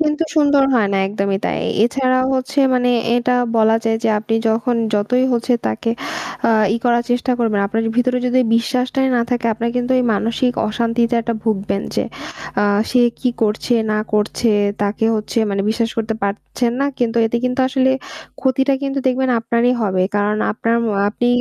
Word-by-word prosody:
কিন্তু 300 Hz, 0 st, +1 dB
সুন্দর 285 Hz, -2 st, +4 dB
হয় 220 Hz, -4 st, +3 dB
না -, -, +1 dB
একদমই 195 Hz, -1 st, -1 dB
তাই। -, -, -1 dB, 0.3 s
এছাড়াও 255 Hz, +1 st, +1 dB
হচ্ছে 260 Hz, +2 st, -3 dB, 0.2 s
মানে 245 Hz, 0 st, +2 dB, 0.3 s
এটা 250 Hz, +1 st, +1 dB, 0.2 s
বলা 220 Hz, 0 st, +4 dB
যায় 225 Hz, 0 st, +1 dB
যে -, -, +3 dB
আপনি 225 Hz, +1 st, -3 dB
যখন 230 Hz, +2 st, 0 dB, 0.2 s
যতই 230 Hz, +5 st, +1 dB
হচ্ছে 240 Hz, +1 st, 0 dB
তাকে 110 Hz, -, -2 dB, 0.8 s
ই -, -, +1 dB
করার 240 Hz, 0 st, +3 dB
চেষ্টা 245 Hz, +1 st, +1 dB
করবেন। 220 Hz, -4 st, +1 dB
আপনার 225 Hz, +3 st, -1 dB
ভিতরে 250 Hz, 0 st, +2 dB
যদি 250 Hz, +1 st, +2 dB, 0.2 s
বিশ্বাসটাই 255 Hz, +2 st, 0 dB
না -, -, +2 dB
থাকে 240 Hz, -1 st, 0 dB
আপনারা 235 Hz, +2 st, -2 dB
কিন্তু 245 Hz, +1 st, 0 dB
এই 250 Hz, -, +1 dB
মানসিক 230 Hz, +4 st, 0 dB, 0.2 s
অশান্তিতে 230 Hz, +1 st, 0 dB
একটা 230 Hz, 0 st, -2 dB
ভুগবেন 200 Hz, -2 st, -1 dB
যে। -, -, 0 dB, 0.6 s
আ -, -, +3 dB, 0.3 s
সে 250 Hz, -, +3 dB, 0.2 s
কি 255 Hz, -, +1 dB
করছে 220 Hz, +3 st, 0 dB, 0.2 s
না 215 Hz, -, +1 dB
করছে 210 Hz, +2 st, 0 dB, 0.3 s
তাকে 205 Hz, +2 st, -1 dB
হচ্ছে 215 Hz, +2 st, -3 dB
মানে 195 Hz, 0 st, -1 dB
বিশ্বাস 225 Hz, 0 st, -1 dB
করতে 220 Hz, 0 st, -1 dB
পারছেন 210 Hz, +4 st, -2 dB
না। 280 Hz, -, +2 dB
কিন্তু 235 Hz, -1 st, 0 dB
এতে 225 Hz, -, -1 dB
কিন্তু 250 Hz, +1 st, 0 dB
আসলে 265 Hz, 0 st, +2 dB, 0.5 s
ক্ষতিটা 265 Hz, +1 st, +1 dB
কিন্তু 275 Hz, 0 st, -2 dB
দেখবেন 260 Hz, 0 st, +1 dB
আপনারই 235 Hz, +2 st, +1 dB
হবে। 190 Hz, -3 st, +1 dB
কারণ 205 Hz, +1 st, +1 dB, 0.2 s
আপনার 230 Hz, +1 st, -1 dB
ম -, -, -1 dB, 0.2 s
আপনি 235 Hz, +3 st, -2 dB
235 Hz, 175 wpm, -18 LUFS, 220-255 Hz, 0.8 s, সুন্দর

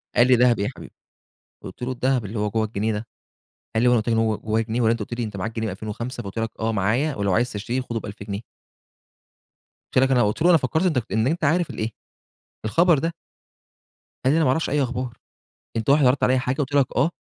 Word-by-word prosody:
قال 120 Hz, -, +5 dB
لي: 130 Hz, -, +6 dB
"دهب 120 Hz, -1 st, +4 dB
إيه 100 Hz, -, 0 dB
يا -, -, -2 dB
حبيبي؟" -, -, -11 dB, 0.7 s
قُلت -, -, -10 dB
له: 130 Hz, +1 st, -1 dB
"الدهب 130 Hz, -2 st, 0 dB
اللي 105 Hz, +2 st, -5 dB
هو 105 Hz, 0 st, 0 dB
جوّه 110 Hz, +1 st, 0 dB
الجنيه 110 Hz, +1 st, -1 dB
ده." 105 Hz, +2 st, -4 dB, 0.7 s
قال 110 Hz, -, +2 dB
لي: 125 Hz, -, +5 dB
"هو -, -, +4 dB
أنا 120 Hz, -, +4 dB
قُلت 110 Hz, -, -5 dB
لك 115 Hz, -, +2 dB
إن 115 Hz, -, +2 dB
هو 110 Hz, -2 st, +1 dB
جوّاه 110 Hz, +1 st, -1 dB
جنيه 115 Hz, +2 st, -2 dB
والّا 115 Hz, -1 st, +4 dB
أنت 115 Hz, -, -1 dB
قُلت 105 Hz, +3 st, -5 dB
لي 120 Hz, -, -2 dB
أنت 105 Hz, -3 st, -5 dB
معاك 105 Hz, +5 st, -4 dB
جنيه 110 Hz, -, -2 dB
من 105 Hz, -, -3 dB
2005 115 Hz, +5 st, -5 dB
فقُلت 100 Hz, +3 st, -5 dB
لك 115 Hz, 0 st, -1 dB
آه 110 Hz, 0 st, 0 dB
معايا 115 Hz, +9 st, +1 dB
ولو 100 Hz, -2 st, 0 dB
عايز 120 Hz, +4 st, +1 dB
تشتريه 115 Hz, +5 st, -2 dB
خده 115 Hz, -3 st, -4 dB
ب1000 100 Hz, -1 st, -8 dB
جنيه؟ 100 Hz, +1 st, -5 dB, 1.5 s
قُلت 130 Hz, -, +5 dB
لك 135 Hz, -, +2 dB
أنا 125 Hz, -2 st, +4 dB
قُلت 105 Hz, +7 st, -1 dB
له: 175 Hz, -, +5 dB
"أنا 170 Hz, -, +7 dB
فكرت 160 Hz, +6 st, 0 dB
أنت 155 Hz, -8 st, +2 dB
إن 110 Hz, +3 st, +2 dB
أنت 165 Hz, +3 st, -1 dB
عارف 165 Hz, +3 st, +2 dB
الإيه؟ 110 Hz, -, -3 dB, 0.8 s
الخبر 170 Hz, +7 st, +4 dB
ده." 165 Hz, +4 st, -1 dB, 1.1 s
قال 130 Hz, +3 st, +3 dB
لي: -, -, +3 dB
"أنا 165 Hz, -, +3 dB
معرفش 135 Hz, +5 st, +1 dB
أي 145 Hz, 0 st, +2 dB
أخبار، 125 Hz, -1 st, -3 dB, 0.6 s
أنت 110 Hz, +3 st, 0 dB
واحد 140 Hz, -1 st, +5 dB
عرضت 125 Hz, +2 st, +3 dB
عليَّ 130 Hz, 0 st, +3 dB
حاجة 130 Hz, 0 st, -1 dB
قُلت 145 Hz, -1 st, -2 dB
لك 140 Hz, -2 st, +4 dB
آه" 140 Hz, +7 st, +3 dB
120 Hz, 245 wpm, -23 LUFS, 110-135 Hz, 1.5 s, أنا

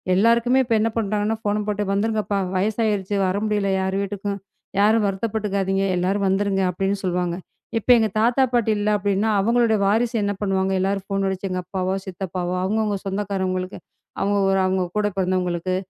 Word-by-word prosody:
எல்லாருக்குமே 235 Hz, +5 st, +4 dB
இப்ப 230 Hz, -, 0 dB
என்ன 225 Hz, +1 st, +2 dB
பண்றாங்கன்னா, 215 Hz, +1 st, 0 dB
ஃபோன 210 Hz, 0 st, 0 dB
போட்டு 210 Hz, 0 st, -1 dB
"வந்துருங்கப்பா! 210 Hz, -1 st, 0 dB, 0.2 s
வயசாயிருச்சு, 205 Hz, 0 st, 0 dB
வர 185 Hz, +2 st, 0 dB
முடியல 205 Hz, -2 st, 0 dB
யார் 190 Hz, 0 st, -1 dB
வீட்டுக்கும், 200 Hz, 0 st, -4 dB, 0.4 s
யாரும் 215 Hz, +1 st, +4 dB
வருத்தப்பட்டுக்காதீங்க, 195 Hz, -1 st, -1 dB
எல்லாரும் 195 Hz, +3 st, 0 dB
வந்துருங்க" 195 Hz, 0 st, +1 dB
அப்பிடின்னு 195 Hz, +2 st, -1 dB
சொல்லுவாங்க. 180 Hz, -1 st, -1 dB, 0.4 s
இப்ப 235 Hz, -, -12 dB
எங்க 220 Hz, -1 st, +2 dB
தாத்தா, 245 Hz, +4 st, +3 dB
பாட்டி 230 Hz, -2 st, +2 dB
இல்ல 210 Hz, +1 st, 0 dB
அப்பிடின்னா, 205 Hz, +2 st, 0 dB
அவுங்களுடைய 230 Hz, -1 st, +2 dB
வாரிசு 230 Hz, +3 st, +1 dB
என்ன 205 Hz, 0 st, 0 dB
பண்ணுவாங்க, 190 Hz, -1 st, 0 dB
எல்லாரும் 195 Hz, 0 st, -1 dB
ஃபோன் 195 Hz, -1 st, -1 dB
அடிச்சு, 190 Hz, +1 st, -3 dB
எங்க 185 Hz, 0 st, -2 dB
அப்பாவோ! 185 Hz, 0 st, -2 dB
சித்தப்பாவோ! 180 Hz, -1 st, -4 dB
அவுங்கவுங்க 210 Hz, 0 st, 0 dB
சொந்தக்காரங்களுக்கு, 190 Hz, -2 st, -2 dB, 0.4 s
அவுங்க, 200 Hz, +1 st, +1 dB
ஒரு 195 Hz, -, +2 dB
அவுங்க 185 Hz, -1 st, +1 dB
கூடப் 205 Hz, -2 st, 0 dB
பிறந்தவங்களுக்கு, 185 Hz, -1 st, 0 dB
200 Hz, 155 wpm, -22 LUFS, 190-215 Hz, 0.4 s, எல்லாருக்குமே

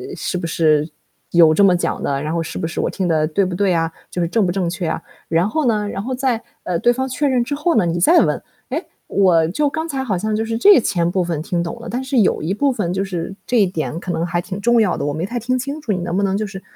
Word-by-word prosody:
是 180 Hz, -, -3 dB
不 170 Hz, -, -4 dB
是 155 Hz, -2 st, +2 dB, 0.4 s
有 165 Hz, -2 st, +6 dB
这 200 Hz, -, +4 dB
么 185 Hz, -2 st, +5 dB
讲 175 Hz, -, -2 dB
的， 140 Hz, 0 st, -1 dB
然 155 Hz, +2 st, -3 dB
后 165 Hz, -1 st, 0 dB
是 -, -, -6 dB
不 165 Hz, -, -2 dB
是 170 Hz, -, -5 dB
我 -, -, 0 dB
听 185 Hz, -2 st, -2 dB
的 155 Hz, -2 st, +2 dB
对 190 Hz, +5 st, +1 dB
不 180 Hz, -1 st, -3 dB
对 195 Hz, -1 st, +2 dB
啊？” 165 Hz, -1 st, 0 dB, 0.2 s
就 180 Hz, -, -2 dB
是 170 Hz, -, +1 dB
正 210 Hz, +2 st, +1 dB
不 175 Hz, -, 0 dB
正 180 Hz, -2 st, -1 dB
确 175 Hz, 0 st, -4 dB
啊。 165 Hz, -, -2 dB, 0.3 s
然 170 Hz, +5 st, +2 dB
后 305 Hz, +4 st, 0 dB
呢， 210 Hz, -3 st, +1 dB
然 195 Hz, -, -4 dB
后 260 Hz, +2 st, -3 dB
在， 250 Hz, -3 st, -1 dB, 0.2 s
呃， 175 Hz, -2 st, -1 dB
对 240 Hz, -, +4 dB
方 260 Hz, +1 st, -2 dB
确 275 Hz, +4 st, -1 dB
认 255 Hz, -2 st, +2 dB
之 285 Hz, +4 st, -3 dB
后 320 Hz, +4 st, +1 dB
呢， 205 Hz, -6 st, +3 dB
你 170 Hz, +1 st, -1 dB
再 340 Hz, -, +6 dB
问， -, -, +1 dB, 0.3 s
“诶， -, -, -3 dB, 0.2 s
我 175 Hz, -5 st, +3 dB
就 290 Hz, +10 st, +1 dB
刚 320 Hz, +2 st, -3 dB
才 270 Hz, -3 st, -3 dB
好 200 Hz, -8 st, -1 dB
像 215 Hz, +3 st, -1 dB
就 220 Hz, -, 0 dB
是 225 Hz, 0 st, -2 dB
这 400 Hz, -, +7 dB
前 170 Hz, -4 st, 0 dB
部 185 Hz, 0 st, 0 dB
分 165 Hz, -3 st, -2 dB
听 175 Hz, -1 st, -1 dB
懂 170 Hz, +8 st, -6 dB
了， 235 Hz, -, -9 dB
但 250 Hz, +2 st, -3 dB
是 260 Hz, 0 st, -1 dB
有 195 Hz, -, +2 dB
一 175 Hz, +5 st, -1 dB
部 280 Hz, +6 st, +1 dB
分 185 Hz, -7 st, -2 dB
就 190 Hz, +1 st, 0 dB
是 180 Hz, -1 st, -4 dB
这 245 Hz, -2 st, +2 dB
一 200 Hz, -, +5 dB
点 160 Hz, -5 st, -3 dB
可 180 Hz, -, -4 dB
能 165 Hz, 0 st, -1 dB
还 175 Hz, 0 st, -1 dB
挺 195 Hz, +2 st, -6 dB
重 235 Hz, +2 st, +3 dB
要 195 Hz, -5 st, +1 dB
的， -, -, -2 dB
我 145 Hz, -, -1 dB
没 160 Hz, +4 st, -2 dB
太 240 Hz, +4 st, -3 dB
听 255 Hz, +3 st, 0 dB
清 280 Hz, +4 st, -4 dB
楚， 225 Hz, -, -2 dB
你 185 Hz, -, -2 dB
能 175 Hz, 0 st, -3 dB
不 200 Hz, -, +1 dB
能 195 Hz, 0 st, +1 dB
就 215 Hz, -, -1 dB
是 195 Hz, -1 st, -8 dB
190 Hz, 320 characters per minute, -19 LUFS, 170-235 Hz, 0.4 s, 这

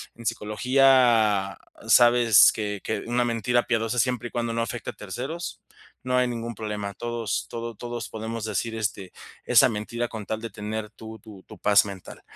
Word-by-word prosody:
En 115 Hz, -, -13 dB
psicología 115 Hz, -3 st, +3 dB, 0.3 s
sabes 120 Hz, -3 st, +6 dB
que 105 Hz, -2 st, -4 dB
que -, -, -2 dB
una 120 Hz, +1 st, +1 dB
mentira 120 Hz, +1 st, +1 dB
piadosa 115 Hz, 0 st, -1 dB
siempre 125 Hz, -1 st, 0 dB
y -, -, -25 dB
cuando 120 Hz, -1 st, -2 dB
no 115 Hz, -, -1 dB
afecte 120 Hz, 0 st, -5 dB
a -, -, -22 dB
terceros, 130 Hz, -, -6 dB, 0.4 s
no 125 Hz, 0 st, 0 dB
hay 125 Hz, 0 st, +3 dB
ningún 120 Hz, -1 st, -4 dB
problema. 105 Hz, -1 st, -5 dB
Todos 120 Hz, -3 st, -3 dB
todo 115 Hz, 0 st, -5 dB
todos 120 Hz, +1 st, -6 dB
podemos 110 Hz, 0 st, -5 dB
decir, 110 Hz, +2 st, -2 dB
este, 105 Hz, -4 st, -3 dB, 0.3 s
esa -, -, +6 dB
mentira 115 Hz, +3 st, -3 dB
con 110 Hz, -3 st, -7 dB
tal 110 Hz, -, -2 dB
de 115 Hz, -, -5 dB
tener 105 Hz, +1 st, -5 dB
tu 110 Hz, 0 st, -10 dB
tu 105 Hz, -5 st, -14 dB
tu 110 Hz, -, -12 dB
paz 100 Hz, -1 st, +5 dB
mental. 100 Hz, -3 st, -9 dB
115 Hz, 175 wpm, -25 LUFS, 105-120 Hz, 0.4 s, sabes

